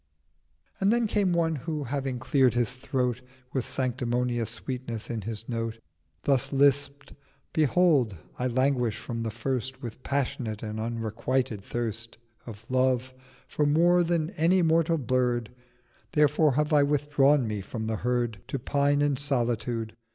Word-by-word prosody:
And 200 Hz, +1 st, +3 dB
then 235 Hz, 0 st, +2 dB
came 205 Hz, -3 st, +1 dB
one 165 Hz, -2 st, +1 dB
who 150 Hz, +2 st, -3 dB
having 135 Hz, 0 st, -2 dB
clear'd 130 Hz, 0 st, +2 dB
his 120 Hz, 0 st, +1 dB
Throat 125 Hz, -1 st, -1 dB, 0.3 s
With 130 Hz, -3 st, -1 dB
sanctimonious 125 Hz, -2 st, -1 dB
Sweetness 125 Hz, -4 st, -5 dB
in 115 Hz, -2 st, -3 dB
his 110 Hz, +2 st, -5 dB
Note 115 Hz, -2 st, -3 dB, 0.5 s
Thus 135 Hz, -1 st, +1 dB
lisp'd—'Behold 140 Hz, -, +1 dB, 0.2 s
I 125 Hz, -, +1 dB
languish 125 Hz, -3 st, +1 dB
from 115 Hz, -2 st, -5 dB
the 115 Hz, -, -2 dB
first 130 Hz, +3 st, -3 dB
With 120 Hz, +1 st, -7 dB
passionate 125 Hz, -6 st, -2 dB
and 110 Hz, 0 st, -4 dB
unrequited 115 Hz, 0 st, -2 dB
Thirst 115 Hz, 0 st, -4 dB, 0.3 s
Of 110 Hz, -1 st, -9 dB
Love 130 Hz, 0 st, +1 dB, 0.3 s
for 150 Hz, -, 0 dB
more 175 Hz, +4 st, +4 dB
than 165 Hz, -1 st, 0 dB
any 180 Hz, 0 st, +3 dB
mortal 165 Hz, 0 st, +3 dB
Bird. 125 Hz, -3 st, 0 dB, 0.7 s
750 -, -, +2 dB
Therefore 150 Hz, 0 st, +4 dB
have 150 Hz, +1 st, +1 dB
I 145 Hz, -, +6 dB
withdrawn 145 Hz, -2 st, +3 dB
me 105 Hz, -2 st, -3 dB
from 110 Hz, +3 st, -5 dB
the 110 Hz, 0 st, -1 dB
Herd 120 Hz, -3 st, -1 dB
To -, -, -2 dB
pine 145 Hz, +2 st, +1 dB
in 145 Hz, -2 st, +1 dB
Solitude. 120 Hz, -5 st, -1 dB
130 Hz, 145 wpm, -27 LUFS, 115-145 Hz, 0.7 s, I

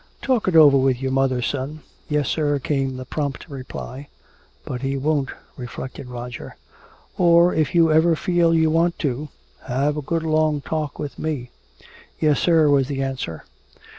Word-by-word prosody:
"Talk 255 Hz, -6 st, +1 dB
it 185 Hz, -, +1 dB
over 145 Hz, -3 st, +8 dB
with 130 Hz, -2 st, +2 dB
your 135 Hz, 0 st, -2 dB
mother, 130 Hz, -2 st, +1 dB
son." 140 Hz, +4 st, -3 dB, 0.3 s
"Yes, 150 Hz, -3 st, 0 dB
sir," 145 Hz, -2 st, +1 dB
came 135 Hz, -1 st, -2 dB
the 130 Hz, -, -7 dB
prompt 145 Hz, +1 st, -4 dB
reply. 135 Hz, -1 st, -8 dB, 0.6 s
"But 125 Hz, -1 st, -5 dB
he 135 Hz, 0 st, -1 dB
won't," 145 Hz, -1 st, 0 dB, 0.3 s
reflected 130 Hz, +1 st, -7 dB
Roger. 120 Hz, 0 st, -7 dB, 0.6 s
"Or 170 Hz, 0 st, +5 dB
if 155 Hz, +1 st, 0 dB
you 165 Hz, -2 st, +5 dB
ever 160 Hz, +2 st, +4 dB
feel 175 Hz, 0 st, +2 dB
you 160 Hz, -1 st, +3 dB
want 170 Hz, +2 st, +2 dB
to, 140 Hz, +3 st, -2 dB, 0.4 s
have 140 Hz, +4 st, 0 dB
a -, -, -2 dB
good 165 Hz, +3 st, -2 dB
long 155 Hz, -1 st, +1 dB
talk 155 Hz, -1 st, -3 dB
with 145 Hz, -2 st, -6 dB
me." 140 Hz, -6 st, -3 dB, 0.7 s
"Yes, 150 Hz, -2 st, +2 dB
sir," 165 Hz, -3 st, +4 dB
was 140 Hz, -2 st, +3 dB
the 135 Hz, -1 st, -2 dB
answer. 125 Hz, -, -4 dB
145 Hz, 165 wpm, -22 LUFS, 135-160 Hz, 0.7 s, over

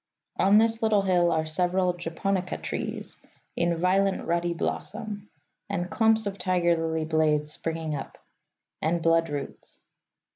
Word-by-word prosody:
On 195 Hz, +2 st, +5 dB
this 225 Hz, +1 st, +3 dB
little 215 Hz, -3 st, +3 dB
hill 175 Hz, -2 st, +3 dB
are 160 Hz, -1 st, +1 dB
several 180 Hz, +3 st, +1 dB
japonica 180 Hz, +2 st, -2 dB
trees, -, -, -5 dB, 0.4 s
in 170 Hz, 0 st, +1 dB
violent 190 Hz, +3 st, +1 dB
ruddy 170 Hz, +1 st, 0 dB
blossom; 210 Hz, +3 st, -4 dB, 0.4 s
and 175 Hz, +1 st, -2 dB
clumps 220 Hz, -1 st, +3 dB
of 200 Hz, 0 st, -4 dB
tiger 175 Hz, -2 st, +2 dB
lily 160 Hz, -1 st, -1 dB
blades 155 Hz, -1 st, +1 dB
springing 160 Hz, -1 st, -2 dB
up; 140 Hz, -, -7 dB, 0.6 s
and 165 Hz, +1 st, 0 dB
bloodroots. 165 Hz, -3 st, -1 dB
175 Hz, 130 wpm, -27 LUFS, 165-195 Hz, 0.6 s, On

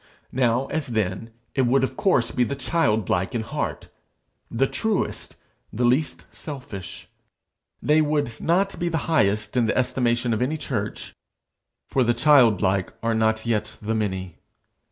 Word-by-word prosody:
Now, 125 Hz, 0 st, +2 dB
as 155 Hz, -2 st, -2 dB
then, 110 Hz, -1 st, -2 dB, 0.2 s
it 130 Hz, -3 st, +2 dB
would 130 Hz, +2 st, +3 dB
of 130 Hz, -, -1 dB
course 130 Hz, -, +2 dB
be 125 Hz, -, +1 dB
the 140 Hz, +4 st, -2 dB
childlike 110 Hz, -, 0 dB
in 115 Hz, -, -1 dB
heart, -, -, -4 dB, 0.6 s
the 125 Hz, +4 st, +1 dB
truest, 220 Hz, +8 st, -2 dB, 0.4 s
the 120 Hz, +3 st, 0 dB
least 130 Hz, +6 st, +1 dB
selfish. 130 Hz, -, -8 dB, 0.8 s
They 155 Hz, +1 st, +4 dB
would 145 Hz, -6 st, -1 dB
not 195 Hz, +4 st, +1 dB
be 175 Hz, -, 0 dB
the 165 Hz, -, 0 dB
highest 105 Hz, -8 st, +1 dB
in 120 Hz, -3 st, +3 dB
the -, -, 0 dB
estimation 120 Hz, -2 st, +1 dB
of 110 Hz, -, -1 dB
any 145 Hz, +5 st, 0 dB
church, 110 Hz, -8 st, -4 dB, 0.7 s
for 130 Hz, -, +2 dB
the 120 Hz, 0 st, +2 dB
childlike 115 Hz, -, +4 dB
are 115 Hz, 0 st, +1 dB
not 110 Hz, 0 st, +1 dB
yet 110 Hz, -2 st, -1 dB
the 110 Hz, +1 st, -2 dB
many. 95 Hz, -5 st, -3 dB
120 Hz, 150 wpm, -24 LUFS, 110-140 Hz, 0.8 s, They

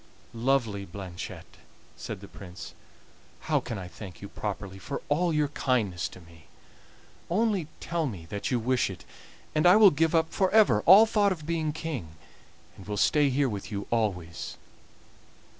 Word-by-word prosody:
"Lovely 115 Hz, -4 st, 0 dB
Blanchette," 90 Hz, -2 st, -8 dB, 0.4 s
said -, -, -7 dB
the -, -, -10 dB
Prince, 90 Hz, -2 st, -10 dB, 0.7 s
"how -, -, +1 dB
can 115 Hz, -, -6 dB
I 95 Hz, -2 st, -6 dB
thank 90 Hz, -2 st, -10 dB
you 100 Hz, -, -8 dB
properly 100 Hz, -2 st, -5 dB
for 140 Hz, -, -5 dB
all 170 Hz, +4 st, +2 dB
your 150 Hz, -2 st, +1 dB
kindness 110 Hz, -, 0 dB
to -, -, -13 dB
me? 85 Hz, -2 st, -17 dB, 0.8 s
Only 200 Hz, -3 st, +1 dB
tell 170 Hz, -2 st, -2 dB
me 95 Hz, -10 st, -7 dB
that 100 Hz, +4 st, -4 dB
you 125 Hz, -, +1 dB
wish 125 Hz, 0 st, +1 dB
it, 95 Hz, -, -9 dB, 0.5 s
and 155 Hz, +3 st, +3 dB
I 180 Hz, -, +8 dB
will 210 Hz, -3 st, +8 dB
give 160 Hz, +3 st, +1 dB
up 160 Hz, 0 st, +1 dB
for 190 Hz, -1 st, +2 dB
ever 200 Hz, -, +5 dB
all 200 Hz, +5 st, +10 dB
thought 210 Hz, -2 st, +2 dB
of 160 Hz, -5 st, -4 dB
being 160 Hz, -1 st, -1 dB
king, 145 Hz, -, -5 dB, 0.6 s
and 95 Hz, -, -13 dB
will 105 Hz, -1 st, -3 dB
stay 145 Hz, +6 st, +3 dB
here 135 Hz, +1 st, +2 dB
with 105 Hz, -4 st, -5 dB
you 100 Hz, -1 st, -4 dB
always." 95 Hz, -8 st, -2 dB
125 Hz, 165 wpm, -28 LUFS, 100-160 Hz, 0.8 s, all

